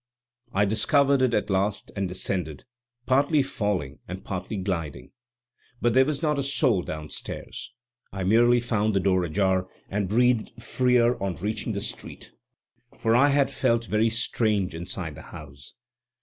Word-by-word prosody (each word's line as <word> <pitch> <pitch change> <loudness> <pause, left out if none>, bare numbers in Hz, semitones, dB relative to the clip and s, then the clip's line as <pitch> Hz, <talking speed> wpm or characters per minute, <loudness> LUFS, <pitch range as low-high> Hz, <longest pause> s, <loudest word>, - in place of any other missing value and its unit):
I 100 -1 +2
discovered 135 +7 +3
it 125 -2 +2
at 105 - -1
last 95 +2 -1
and 95 -2 -2
descended, 90 -4 -3 0.4
partly 140 +2 +3
falling 100 - -2
and 90 +2 -7
partly 95 +2 -4
gliding. 90 -5 -4 0.7
But 120 -1 +2
there 130 +1 +5
was 150 +1 -3
not 150 -2 +1
a - - +1
soul 130 - +2
downstairs. 75 +4 -7 0.4
I 95 -1 -4
merely 120 +5 +4
found 110 -3 0
the - - +4
door 95 -1 +2
ajar, 95 +2 +1 0.2
and 100 -1 -1
breathed 120 +1 +1
freer 125 0 +2
on 95 -2 -2
reaching 105 +6 -3
the - - -3
street, - - -6 0.7
for 115 0 +2
I 140 +4 +5
had 140 -1 +2
felt 115 0 +1
very 110 +1 +2
strange 110 -4 0
inside 85 0 -5
the - - -11
house. 70 -3 -12
105 Hz, 150 wpm, -26 LUFS, 95-120 Hz, 0.7 s, there